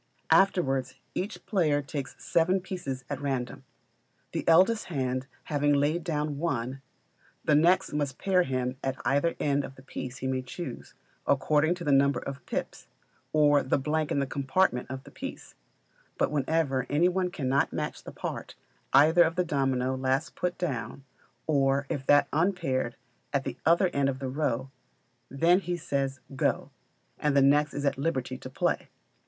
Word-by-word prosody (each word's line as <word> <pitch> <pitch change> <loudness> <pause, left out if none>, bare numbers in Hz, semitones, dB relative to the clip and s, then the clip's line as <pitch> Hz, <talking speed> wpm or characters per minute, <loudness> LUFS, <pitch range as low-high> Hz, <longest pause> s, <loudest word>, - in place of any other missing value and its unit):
Afterwards 135 -10 +3 0.2
each 200 +4 -4
player 160 -9 +2
takes 140 -1 -5
seven 175 +3 +2
pieces 175 -9 -5
at - - -4
random. 130 -3 -3 0.7
The - - -4
eldest 190 +7 +5
hand 130 -4 -2 0.2
having 145 -1 +1
laid 150 +4 +1
down 150 -3 -2
one, 135 -5 -2 0.6
the 150 - +3
next 170 +5 +4
must 145 -3 -1
pair 190 -2 +2
him 130 -4 -2
at 135 0 -2
either 145 +5 +2
end 145 -1 +1
of 135 - -8
the 130 - -15
piece 130 -1 -6
he 135 - -6
may 130 0 0
choose, 130 +2 -8 0.3
according 150 +4 +3
to 175 - -8
the 150 - +1
number 140 0 +4
of 140 -2 -7
pips, - - -4 0.4
or 145 -2 +4
the 130 - +1
blank 150 +2 -1
in - - +1
the 140 - +1
compartment 135 0 0
of 130 0 -6
the - - -14
piece; - - -8 0.6
but - - +1
whenever 140 -3 0
any 155 +5 +3
one 180 0 0
cannot 140 -4 0
match - - -4
the - - -8
part, - - -6 0.4
either 155 +6 +6
of 165 -1 +4
the 180 -1 +1
domino 135 -4 0
last 130 +4 0
put 180 -1 -2
down, 135 -6 -3 0.4
or 140 -2 +2
of 135 -2 -3
that 145 0 +5
unpaired 160 -8 0 0.4
at 140 -1 +1
the 130 -2 -4
other 170 +3 +5
end 140 -4 +1
of 135 - -3
the 135 -1 -4
row, 130 -2 -1 0.6
then 165 +7 +4
he 180 -2 -3
says, 135 -4 -2
"Go;" - - 0 0.5
and 145 -2 +1
the 140 - +6
next 145 +2 +3
is 145 - -2
at 140 - 0
liberty 135 -4 -1
to - - -8
play. 130 - -1
140 Hz, 170 wpm, -28 LUFS, 135-165 Hz, 0.7 s, either